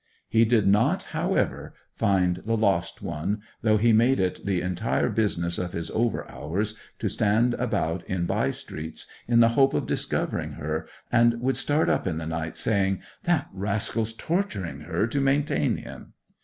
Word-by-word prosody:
He 115 0 +4
did 115 -2 +3
not, 105 +3 +3
however, - - -1 0.2
find 90 -3 +2
the 115 +1 -1
lost 95 -5 0
one, 100 +8 -3 0.2
though 110 -1 +3
he 115 +2 +4
made 120 +3 +4
it 95 -1 -1
the 95 -3 +1
entire 90 +7 0
business 100 -6 0
of 90 -1 -3
his 85 -1 -3
over 115 +1 0
hours 100 +8 -3 0.2
to - - -2
stand 115 +4 +2
about 95 -9 -1
in 90 -2 -1
by - - +1
streets 80 +1 -6 0.2
in 120 0 +5
the 115 - +6
hope 135 +3 +3
of 75 - 0
discovering - - -1
her, - - -4 0.2
and 120 0 +4
would 130 +2 0
start 150 +2 +2
up - - +1
in 80 -3 -1
the 80 - -4
night, 80 0 -4
saying, 95 -3 +1 0.3
'That 170 -5 +1
rascal's 105 +3 -1
torturing 110 - -2
her 85 +6 -1
to 140 +4 -1
maintain 145 +2 +1
him! - - -10
105 Hz, 170 wpm, -26 LUFS, 90-115 Hz, 0.3 s, the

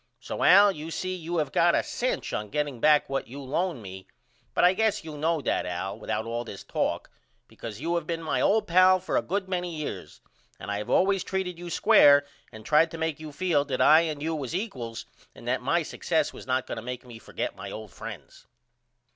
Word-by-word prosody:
So - - -6
Al 200 +2 +7
you 155 -2 -7
see 185 +3 -3
you 170 0 -4
have 150 -4 -1
got - - +4
a - - +2
cinch - - -3
on 105 0 -3
getting 145 -1 -2
back 150 +3 +4
what 135 0 -3
you 135 +4 -9
lone 145 - -2
me 95 0 -9 0.5
but - - +2
I 180 +1 +6
guess 215 -1 0
you 155 -2 -8
know 160 +1 0
that 125 - -1
Al 90 +2 -4
without 110 - -3
all 115 +1 -3
this 100 -4 -9
talk - - -2 0.4
because 110 -2 -9
you 165 +4 -2
have 170 -3 -2
been 165 -1 -3
my 160 - 0
old 220 +2 +3
pal 185 +1 +5
for 185 - -3
a - - +3
good 195 +1 -2
many 180 -2 -3
years 155 -1 -6 0.4
and - - -6
I 100 - -2
have 105 - -6
allways 195 0 +3
treated 185 -3 -3
you 175 0 -7
square 145 -3 +6 0.3
and 110 0 -12
tried 155 +5 +4
to 165 - -8
make 160 -2 -2
you 155 -1 -8
feel 160 -2 +1
that 135 -3 -3
I 155 +1 +7
and 155 -3 -3
you 160 +1 -1
was 150 0 -4
equals 130 - -5 0.3
and - - -12
that - - 0
my - - +1
success - - -1
was - - -11
not 130 0 0
going - - -6
to - - -4
make 125 +2 -6
me 120 -2 -11
forget - - -5
my - - -8
old 110 -3 -8
friends. - - -10
155 Hz, 225 wpm, -27 LUFS, 125-175 Hz, 0.5 s, Al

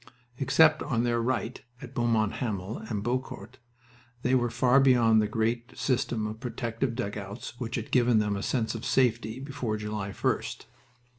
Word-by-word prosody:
Except 155 +3 +5
on 120 -5 0
their 120 -1 +1
right, 120 0 -2 0.2
at - - -10
Beaumont 115 -3 +1
Hamel 105 -4 -3
and 105 -3 -4
Beaucourt, 125 +3 -4 0.6
they 125 - +2
were 120 -2 +3
far 125 +3 +4
beyond 120 -5 +5
the 105 - +1
great 115 +3 -2
system 120 -4 0
of 105 +1 -5
protective 120 0 -3
dugouts 105 0 -5
which 120 0 -3
had 115 -4 -4
given 120 -2 +4
them 105 -1 +1
a 100 - -3
sense 115 +1 -1
of 115 - -6
safety 120 -1 +1
before 130 -5 -3
July 105 -1 -4
1st. 95 - -2
115 Hz, 160 wpm, -28 LUFS, 110-125 Hz, 0.6 s, Except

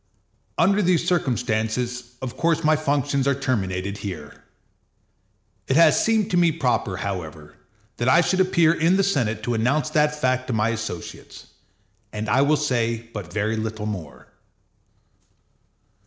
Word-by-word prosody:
Under 195 +5 +3
these 175 -2 +1
circumstances, 125 -5 -1
of 125 -2 -5
course 165 -1 +1
my 155 0 +4
functions 140 -2 0
are 140 - +2
terminated 100 -6 -2
here. 75 -7 -8 1.2
It 130 - +1
has 165 -1 +5
seemed 220 -3 +1
to 180 - +2
me 170 -2 +4
proper, 120 - -1
however, 80 -6 -6 0.4
that 120 +2 +1
I 170 +6 +6
should 185 +2 0
appear 170 -3 +4
in 170 +3 +2
the 195 - +3
Senate 115 - 0
to 120 - -1
announce 135 +7 0
that 150 0 +1
fact 130 -2 0
to 125 - -2
my 110 0 +1
associates, 110 -6 -6 0.7
and 105 +1 -4
I 135 - +3
will 150 +2 +3
say 115 -5 -1
but 100 -5 -7
very 110 +3 -1
little 110 -1 -4
more. 90 -9 -7
125 Hz, 145 wpm, -23 LUFS, 110-155 Hz, 1.2 s, I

